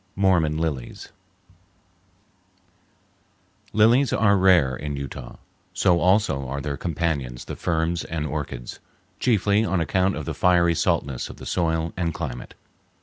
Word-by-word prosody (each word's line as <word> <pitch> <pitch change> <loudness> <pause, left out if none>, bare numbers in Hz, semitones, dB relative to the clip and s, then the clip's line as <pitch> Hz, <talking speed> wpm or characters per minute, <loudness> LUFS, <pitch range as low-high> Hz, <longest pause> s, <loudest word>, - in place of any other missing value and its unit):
Mormon 90 -6 +2
Lilies 75 -7 -4 2.6
Lilies 115 +5 +4
are 100 -2 +3
rare 90 -9 +4
in 75 +1 -5
Utah; 65 -3 -7 0.4
so 90 -2 +3
also 90 -8 +2
are 70 +2 -4
their 70 +1 -3
companions 70 -6 -3
the - - -6
ferns 85 0 -1
and 80 -2 -3
orchids, 75 -5 -5 0.4
chiefly 105 -2 +2
on 95 -5 0
account 95 +3 +1
of - - -5
the - - -3
fiery 85 -2 +3
saltness 70 -5 -1
of - - -10
the - - -10
soil 80 -1 -1
and 85 -3 -2
climate. 65 -7 -6
85 Hz, 130 wpm, -24 LUFS, 70-95 Hz, 2.6 s, Lilies